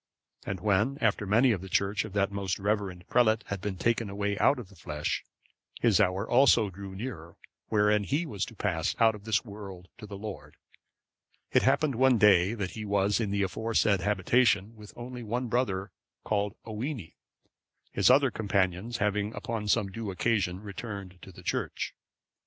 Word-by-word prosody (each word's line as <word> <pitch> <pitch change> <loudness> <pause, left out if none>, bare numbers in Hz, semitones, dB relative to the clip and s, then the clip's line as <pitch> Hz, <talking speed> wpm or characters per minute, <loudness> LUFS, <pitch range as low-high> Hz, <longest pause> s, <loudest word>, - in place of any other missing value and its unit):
And 95 -2 -3
when, 105 +7 +2
after 105 -2 +1
many 115 +6 +4
of 100 -6 -1
the 95 - -8
Church 100 +2 +1
of 105 - -9
that 100 -1 +1
most 100 -2 -2
reverend 100 -3 -2
prelate 110 -2 +3
had 100 -2 -3
been 100 -1 -3
taken 115 +1 0
away 100 +1 -1
out 140 - +4
of 115 -7 -8
the 100 - -17
flesh, 75 -4 -3 0.6
his 115 -6 +3
hour 95 +1 +1
also 120 -5 +4
drew 95 0 -9
near 95 -7 -7 0.3
wherein 105 -1 +3
he 150 - 0
was 105 - -3
to 115 - -12
pass 85 -6 -1
out 115 -1 +5
of 105 -1 -11
this 110 0 +1
world 100 -4 -9
to 105 - -9
the 100 -1 -7
Lord, 95 -9 -8 0.9
it - - +4
happened 155 -3 +2
one 130 +1 +4
day 100 0 +5
that 95 -4 -3
he 110 - -6
was 100 0 +1
in 110 -3 -1
the 100 0 0
aforesaid 105 0 +1
habitation 105 +1 +2
with 105 -1 -12
only 125 +1 -7
one 120 +2 -3
brother, 100 -5 -1 0.3
called 105 -1 -1
Owini,(549) 115 - -5 0.8
his - - +3
other 135 0 +5
companions 100 +2 -1
having 105 0 -1
upon 115 -2 -4
some 105 -2 +1
due 110 0 -5
occasion 95 -2 0
returned 100 -3 -7
to 95 - -11
the - - -14
church. - - -2
105 Hz, 175 wpm, -29 LUFS, 95-115 Hz, 0.9 s, out